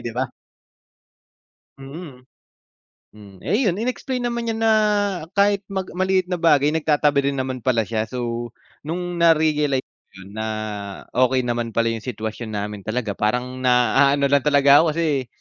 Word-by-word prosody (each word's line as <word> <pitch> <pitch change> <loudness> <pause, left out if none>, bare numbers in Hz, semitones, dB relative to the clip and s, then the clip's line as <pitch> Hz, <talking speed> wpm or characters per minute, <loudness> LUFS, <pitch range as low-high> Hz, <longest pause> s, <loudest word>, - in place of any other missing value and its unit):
di 120 - -4
ba? 130 +1 0 1.5
Mm, 135 -2 -10 0.9
mm, 105 -2 -14
eh 210 - 0
yun 180 - +2
in-explain 250 +4 -3
naman 235 -1 -2
niya 225 - -1
na 225 0 +2 0.6
kahit 200 0 +2
mag 190 -1 -4
maliit 185 0 0
na 180 - -1
bagay 150 -4 +4
nagtatabi 150 -2 +1
din 140 0 -1
naman 130 -1 -3
pala 120 -2 +1
siya. 110 0 -2
So 120 0 -4 0.4
nung 175 +2 -4
narealize 155 -5 +3
ko - - -77 0.2
yun 95 - -13
na 110 - -2 0.6
okey 130 0 +2
naman 120 -2 -3
pala 115 0 +2
yung 115 -1 -5
sitwasyon 110 -1 -5
namin 105 0 -4
talaga 110 0 -2
parang 125 +4 -1
na 125 -2 +2
aano 140 0 +2
lang 140 -1 +3
talaga 145 -1 +6
ako 160 -2 +2
kasi, 150 -6 0
140 Hz, 155 wpm, -22 LUFS, 120-170 Hz, 1.5 s, talaga